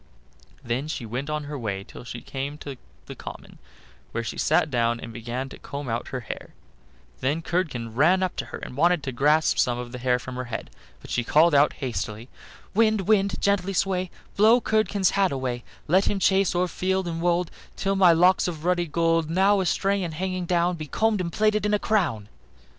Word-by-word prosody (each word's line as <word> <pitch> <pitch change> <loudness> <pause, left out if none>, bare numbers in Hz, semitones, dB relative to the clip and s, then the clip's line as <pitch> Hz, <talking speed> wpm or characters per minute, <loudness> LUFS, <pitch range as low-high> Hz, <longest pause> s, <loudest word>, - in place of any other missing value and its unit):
Then 125 +5 -2
she 140 -6 -4
went 125 +6 -4
on 150 0 -2
her 145 -1 -6
way 100 -4 -3
till 110 - -12
she 120 0 -7
came 140 +2 -5
to 140 -2 -7 0.3
the - - -8
common, - - -10 0.5
where 115 - -2
she - - -5
sat 155 0 +2
down 120 -1 +1
and 115 0 -8
began 120 +3 -4
to - - -11
comb 140 -1 -6
out 115 0 -2
her 130 -2 -4
hair; 115 - -8 0.6
then 145 +5 -1
Curdken 130 -12 -2
ran 175 +9 +4
up 185 - -2
to - - -2
her - - -7
and - - -8
wanted 170 +1 +3
to 135 - -3
grasp 150 +5 +2
some 120 -1 +2
of 120 -1 -6
the 125 - -7
hair 125 0 +2
from 125 0 -7
her 125 - -3
head, 120 -1 -6 0.3
but - - -11
she 120 - 0
called 160 +6 +4
out 145 +1 +5
hastily: 115 -2 -4 0.4
"Wind, 215 -1 +3
wind, 200 -2 +2
gently 195 -1 +1
sway, 185 -1 0 0.3
Blow 220 +4 +6
Curdken's 215 -4 +1
hat 195 -1 +2
away; 130 -3 -3 0.2
Let 185 +5 +4
him 205 - 0
chase 190 -1 +2
o'er 180 +1 +2
field 190 +1 -1
and 165 -1 -3
wold 175 0 +1 0.2
Till 195 0 0
my 185 -3 +6
locks 180 +3 +4
of 165 -2 -5
ruddy 175 -1 +1
gold, 165 0 +1
Now 195 +4 +3
astray 195 +2 +1
and 165 -4 -4
hanging 185 +1 -3
down, 175 0 +1
Be 155 -1 -6
combed 220 +4 +1
and 170 -1 -3
plaited 215 +1 +2
in 210 0 +2
a - - +3
crown." 160 - 0
165 Hz, 205 wpm, -25 LUFS, 125-190 Hz, 0.6 s, Blow